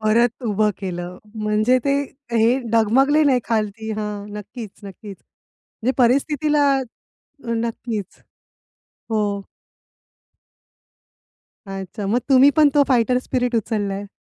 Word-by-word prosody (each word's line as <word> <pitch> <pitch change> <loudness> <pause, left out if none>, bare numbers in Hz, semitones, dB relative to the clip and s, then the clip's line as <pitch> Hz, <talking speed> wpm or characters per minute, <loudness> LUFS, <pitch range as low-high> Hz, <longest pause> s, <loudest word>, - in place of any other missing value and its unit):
परत 235 +3 +2
उभं 210 0 +2
केलं. 180 -2 -5 0.2
म्हणजे 215 +4 +2
ते 280 0 +2 0.4
हे 230 +3 +3
डगमगले 265 +7 +4
नाही 260 -3 +3
खालती 220 -1 -2
हां, 210 -1 -4
नक्कीच-नक्कीच 205 -2 -9 0.7
म्हणजे 255 +3 +2
परिस्थितीला 290 +4 +2 0.9
नक्कीच. 230 -2 -4 0.9
हो. 220 - +1 2.5
अच्छा, 195 +1 -6
मग 235 +5 +1
तुम्ही 270 +1 +7
पण 305 -2 +6
तो 290 - +6
फाईटर 250 -1 +3
स्पिरीट 250 -1 -2
उचलाय? 205 -2 -2
225 Hz, 95 wpm, -21 LUFS, 210-255 Hz, 2.5 s, तुम्ही